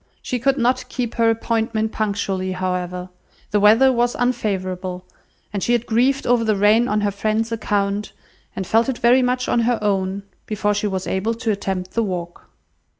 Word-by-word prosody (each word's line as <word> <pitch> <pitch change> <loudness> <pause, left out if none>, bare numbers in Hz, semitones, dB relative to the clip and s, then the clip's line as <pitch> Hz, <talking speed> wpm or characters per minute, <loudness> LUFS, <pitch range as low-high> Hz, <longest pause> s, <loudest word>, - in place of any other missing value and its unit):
She 250 - -2
could 275 +3 +2
not 245 0 0
keep 245 -3 -3
her 230 -1 +3
appointment 225 -1 0
punctually, 195 -3 -2
however; 180 0 -3 0.4
the 210 - +3
weather 225 +6 +6
was 240 0 +1
unfavourable, 185 -6 -2 0.5
and 200 - -2
she 240 - +1
had 240 -1 +1
grieved 255 +4 +1
over 240 -1 +3
the 215 -2 +2
rain 210 +4 +4
on 210 -2 0
her 205 -1 +1
friends' 215 +3 -1
account, 205 -2 -1 0.4
and 190 - -3
felt 225 +7 +2
it 255 - -2
very 245 +2 +4
much 250 0 0
on - - +2
her 235 0 +2
own, 195 -1 -1 0.2
before 210 -1 0
she 210 +1 -1
was 190 -2 -3
able 210 +5 -1
to 230 -1 -1
attempt 190 -2 -3
the 230 - 0
walk. 175 -5 -5
215 Hz, 180 wpm, -21 LUFS, 195-235 Hz, 0.5 s, weather